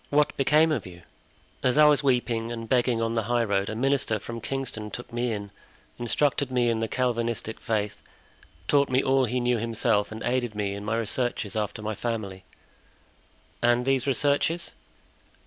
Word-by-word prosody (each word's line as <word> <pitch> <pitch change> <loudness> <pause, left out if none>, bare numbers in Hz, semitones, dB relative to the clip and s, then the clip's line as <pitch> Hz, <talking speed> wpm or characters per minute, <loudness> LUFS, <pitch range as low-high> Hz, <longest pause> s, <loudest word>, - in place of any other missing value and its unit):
"What 150 +1 +2
became 150 +4 +4
of 125 -11 -1
you?" 90 -1 -12 0.6
"As 125 +2 +2
I 150 - +8
was 150 -1 +5
weeping 120 -4 +1
and 115 -1 -5
begging 120 -1 +2
on 115 0 -1
the 115 - +1
high 120 -1 +2
road, 100 -2 0
a 110 - -4
minister 135 -2 +1
from 115 +2 -7
Kingston 120 -5 -4
took 120 +2 -9
me 120 0 0
in, 100 -2 -5 0.5
instructed 140 +3 +1
me 125 -2 +2
in 115 -1 0
the 115 - -1
Calvinistic 115 -2 -1
faith, 105 -2 -2 0.7
taught 140 -1 +3
me 130 +1 +2
all 135 0 +3
he 125 +2 -1
knew 120 -1 +1
himself 115 -2 +1
and 110 +1 -6
aided 120 -3 -1
me 100 -1 -1
in 100 0 -6
my 110 +2 -1
researches 115 -2 -2
after 105 0 -3
my 110 +1 -2
family." 105 -4 -4 1.2
"And 120 +1 +3
these 135 0 +1
researches?" 145 +5 +1
120 Hz, 175 wpm, -26 LUFS, 110-130 Hz, 1.2 s, I